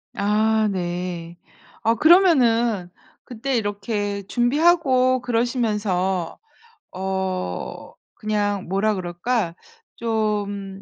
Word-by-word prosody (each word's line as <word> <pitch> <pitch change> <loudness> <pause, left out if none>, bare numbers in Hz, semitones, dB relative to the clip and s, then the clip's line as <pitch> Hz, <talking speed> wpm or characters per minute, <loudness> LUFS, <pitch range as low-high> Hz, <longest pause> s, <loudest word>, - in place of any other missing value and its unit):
아 215 +2 +2
네. 175 -2 -4 0.4
어 225 +1 +2
그러면은 240 - +4 0.3
그때 255 +3 -3
이렇게 205 -1 -2
준비하고 255 -1 +3
그러시면서 210 -7 -1 0.5
어 190 - -4 0.2
그냥 205 -2 -1
뭐라 195 +4 +1
그럴까? 180 +1 -2 0.4
좀 205 -3 -2
210 Hz, 165 characters per minute, -22 LUFS, 190-235 Hz, 0.5 s, 그러면은